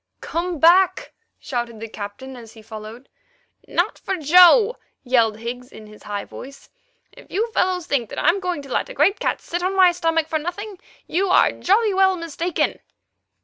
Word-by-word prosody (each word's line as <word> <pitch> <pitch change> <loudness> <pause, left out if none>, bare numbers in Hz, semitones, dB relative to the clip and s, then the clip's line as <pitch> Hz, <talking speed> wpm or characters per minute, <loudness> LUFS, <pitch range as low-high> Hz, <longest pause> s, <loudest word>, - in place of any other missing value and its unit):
"Come 345 +1 -3
back," 350 +5 +3 0.2
shouted 240 -4 -5
the 225 - -6
Captain 215 +5 -8
as 230 -2 -12
he 220 -1 -15
followed. 220 +4 -10 0.6
"Not - - -1
for 385 - -3
Joe!" 360 - +6 0.3
yelled 230 -4 +2
Higgs 245 +2 -7
in 215 - -12
his 210 0 -15
high 205 -1 -5
voice. 275 +1 -12 0.4
"If - - -17
you 450 +5 -2
fellows 365 -4 0
think 245 -9 -1
that - - -9
I'm 340 +6 +2
going 360 -5 -3
to 275 - -8
let - - -1
a - - -9
great 345 +9 +2
cat - - -2
sit 350 +1 -4
on 375 +2 -1
my 370 -2 +6
stomach 330 -2 0
for 315 -1 -1
nothing, 370 +5 -6 0.3
you 380 +3 -1
are - - +4
jolly 415 +2 +1
well 380 -1 +3
mistaken." 335 +1 -2
325 Hz, 180 wpm, -21 LUFS, 240-365 Hz, 0.6 s, Joe